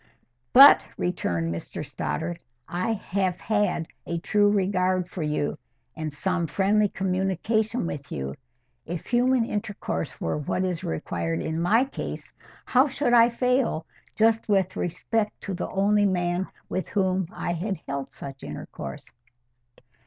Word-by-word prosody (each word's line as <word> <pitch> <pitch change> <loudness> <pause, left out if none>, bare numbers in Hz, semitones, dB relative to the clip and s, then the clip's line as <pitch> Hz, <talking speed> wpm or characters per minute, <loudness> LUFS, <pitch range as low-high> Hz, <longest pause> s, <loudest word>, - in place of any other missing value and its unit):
"But," 275 +3 +9
returned 85 - -1
Mr 85 - -6
Stoddart, 170 +1 -3 0.3
"I 185 +6 -1
had 190 -3 -1
had 205 -6 0 0.2
a 170 - -1
true 205 +4 +3
regard 185 -2 +1
for 180 - -6
you, 150 0 -1 0.4
and 155 -2 -4
some 175 +3 -1
friendly 200 +6 +2
communication 195 +5 0
with 145 -3 -5
you. 70 0 -3 0.5
If 170 0 -4
human 245 0 +3
intercourse 205 - -3
were 80 - -1
what 150 +5 -1
is 180 -3 -2
required 80 +1 -2
in 160 +1 -2
my 225 +9 +4
case, 270 - -6 0.3
how 260 +3 +4
should 265 -2 0
I 235 0 +7
fail 250 -7 +1 0.3
just 225 0 +3
with 190 -2 +2
respect 210 +5 -1
to 195 - -4
the 180 - -3
only 205 +1 +3
man 180 0 0 0.2
with 185 - -3
whom 190 -3 +1
I 175 -5 -3
had 190 +2 -3
held 140 -1 -4
such 135 -1 -9
intercourse?" 70 -1 -7
185 Hz, 140 wpm, -26 LUFS, 165-210 Hz, 0.5 s, But